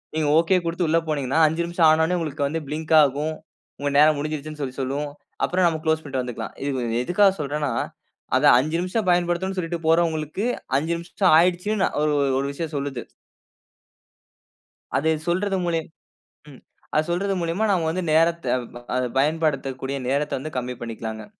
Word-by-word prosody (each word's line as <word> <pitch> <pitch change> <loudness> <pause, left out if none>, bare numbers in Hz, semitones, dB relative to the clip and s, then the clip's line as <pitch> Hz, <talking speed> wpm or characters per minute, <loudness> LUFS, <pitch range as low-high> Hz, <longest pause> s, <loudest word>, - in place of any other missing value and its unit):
நீங்க 155 -2 +1
ஓகே 170 +3 +4
குடுத்து 170 +1 -1
உள்ள 165 +2 +3
போனீங்கனா 140 -1 -1
5 160 +2 -1
நிமிஷம் 170 -1 +3
ஆன 155 +1 +4
உடனே 180 +2 0
உங்களுக்கு 150 -3 -2
வந்து 165 +3 -2
பிளிங்க் 160 +2 -3
ஆகும். 145 +3 0 0.5
உங்க 145 0 -1
நேரம் 150 0 +6
முடிஞ்சுருச்சுன்னு, 155 0 -5
சொல்லி 130 -1 -5
சொல்லும். 140 +3 -2 0.4
அப்புறம் 180 0 +1
நம்ம 160 -2 -1
க்ளோஸ் 160 0 +2
பண்ணிட்டு 130 -3 -3
வந்துக்கலாம். 125 -2 -6
இது 120 -4 -1
எதுக்காக 195 +6 +4
சொல்றேன்னா, 145 -1 -2 0.7
அத - - -1 0.2
5 155 +5 -1
நிமிஷம் 185 +2 -2
பயன்படுத்தனும்னு 175 +2 0
சொல்லிட்டு 170 0 -3
போறவங்களுக்கு, 165 +3 +1 0.3
5 160 +4 -1
நிமிஷம் 175 +1 +1
ஆயிடுச்சுன்னு 185 +4 +1 0.2
ஒரு 155 - +2
ஒரு 135 -1 +1
ஒரு 140 - -1
விஷயம் 160 +1 -5
சொல்லுது. 140 -3 -4 1.9
அதை 160 +3 +2 0.2
சொல்றது 190 +3 0
மூலியம் 165 -2 -1 0.6
ம், 135 - -14 0.3
அத 155 - +4
சொல்றது 195 +2 0
மூலியமா 170 +6 0
நாம 170 -4 +1
வந்து 185 +1 -2
நேரத்த 165 +1 +3
அ - - -2 0.2
ப 120 +1 -4 0.2
பயன்படுத்தக்கூடிய 140 -3 -1
நேரத்த 140 0 0
வந்து 155 -1 -7
கம்மி 125 0 -5
பண்ணிக்கலாங்க! 110 -1 -6
155 Hz, 160 wpm, -23 LUFS, 140-170 Hz, 1.9 s, நேரம்